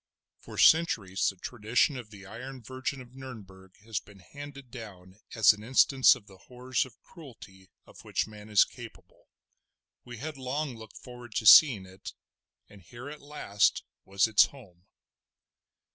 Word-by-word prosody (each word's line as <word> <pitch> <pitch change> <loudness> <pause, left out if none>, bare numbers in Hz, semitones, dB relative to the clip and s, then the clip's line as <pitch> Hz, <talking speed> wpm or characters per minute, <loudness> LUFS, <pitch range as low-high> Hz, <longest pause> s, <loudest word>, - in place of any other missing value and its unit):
For - - -12
centuries 110 - +3
the 95 - -8
tradition 120 +7 0
of 120 -4 -8
the 100 -2 -13
Iron 125 +5 -9
Virgin 130 +3 -5
of 125 0 -15
Nurnberg 100 -8 -12
has 110 -3 -3
been 100 -1 -18
handed 140 +6 -12
down 100 -5 -12 0.2
as 110 -2 +6
an 105 0 -12
instance 130 +2 +4
of - - -15
the 95 -3 -18
horrors 125 +4 -3
of 120 - -21
cruelty 110 - -15 0.2
of - - -16
which - - -1
man 105 0 -13
is 105 -2 +5
capable; 120 -3 -14 0.7
we 120 -1 -10
had 150 +4 -7
long 135 +1 -4
looked 110 -2 -13
forward 120 -3 -12
to 110 - -2
seeing 110 -5 +8
it; 95 +1 -11 0.5
and 100 -1 -17
here 120 - -11
at 150 - -11
last 140 -9 0 0.2
was 95 0 +1
its 110 -2 +5
home. 95 -10 -18
115 Hz, 160 wpm, -28 LUFS, 100-130 Hz, 0.7 s, seeing